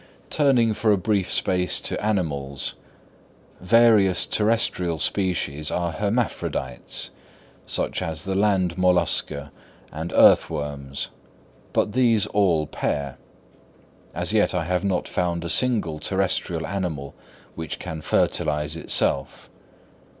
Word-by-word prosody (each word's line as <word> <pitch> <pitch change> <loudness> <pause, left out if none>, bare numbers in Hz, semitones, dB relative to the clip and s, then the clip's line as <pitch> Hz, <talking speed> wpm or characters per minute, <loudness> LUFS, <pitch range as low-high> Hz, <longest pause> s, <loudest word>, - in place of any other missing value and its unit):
Turning 125 -6 +3
for 110 +1 +1
a 100 - +4
brief 95 -1 0
space 90 -1 +2
to - - -3
animals: 70 -10 -1 0.9
various 105 -1 +4
terrestrial 105 -6 +1
species 75 -5 -1
are 85 -1 -1
hermaphrodites, 100 - -2 0.6
such - - -1
as 80 -1 -3
the 95 - -2
land 95 -3 +1
mollusca 85 -5 +1 0.4
and 80 +3 -5
earth - - +6
worms; 70 -3 -4 0.6
but - - +1
these 115 -5 +3
all 90 -7 +2
pair. 70 -2 -3 1.0
As - - 0
yet - - +2
I 90 - 0
have 90 +1 -1
not 95 -3 -1
found 85 -1 -2
a - - -3
single 105 -12 +1
terrestrial 90 -3 -1
animal 80 -7 -4 0.4
which 80 -1 -5
can 80 -1 -6
fertilise 75 0 0
itself. 70 -4 -1
90 Hz, 115 wpm, -23 LUFS, 75-100 Hz, 1.0 s, earth